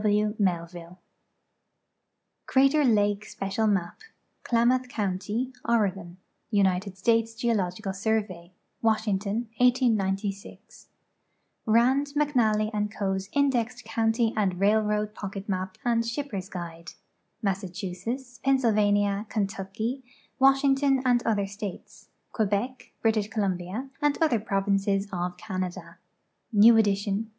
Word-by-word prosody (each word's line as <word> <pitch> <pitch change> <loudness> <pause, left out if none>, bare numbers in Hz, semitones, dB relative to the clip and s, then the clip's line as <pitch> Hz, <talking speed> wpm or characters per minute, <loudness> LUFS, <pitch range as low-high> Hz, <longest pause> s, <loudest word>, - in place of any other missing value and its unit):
O. - - -8
W. 210 0 +2
Melviu.e. 175 -2 -2 1.5
Crater 275 +3 +4
Ixikc 205 -4 +2
Special 205 +2 -2
Map. 190 -4 -1 0.4
Klamath 250 +2 +2
County, 215 +4 -2
Oregon. 195 -6 0 0.3
United 195 -2 +1
States 225 +3 +1
Geo 235 0 0
logical 190 0 -2
Survey. 195 -4 -2 0.3
'Washington, 220 0 0
189fi. 210 -6 0 0.8
Rami, 245 +6 +4
McXalhj 225 -7 +2
ib 210 0 -1
Co.'s 195 -1 -2
Indexed 270 -5 +1
County 225 0 +1
and 190 -4 0
Railroad 210 +1 +2
Pocket 200 -1 -7
Map 185 -1 -3
and 230 -1 +2
Ship 255 +5 -3
pers' 195 -6 -6
Guide. 170 -3 -7 0.5
INIa.ssachusetts, 195 +6 -4
Pennsylvania, 210 -5 +2
Kentucky, 210 +5 -3 0.4
Washington, 270 0 +4
and 245 -1 +3
other 205 -3 +1
states: 200 -1 -8 0.2
Quebec. 225 +4 -2
British 220 -2 +2
Columbia, 200 +3 -3
and 295 -1 +2
other 310 -9 +3
provinces 195 0 0
of 180 0 -3
Canada. 185 -2 -5 0.5
New 225 +2 +7
edition. 205 0 +1
210 Hz, 105 wpm, -27 LUFS, 195-235 Hz, 1.5 s, New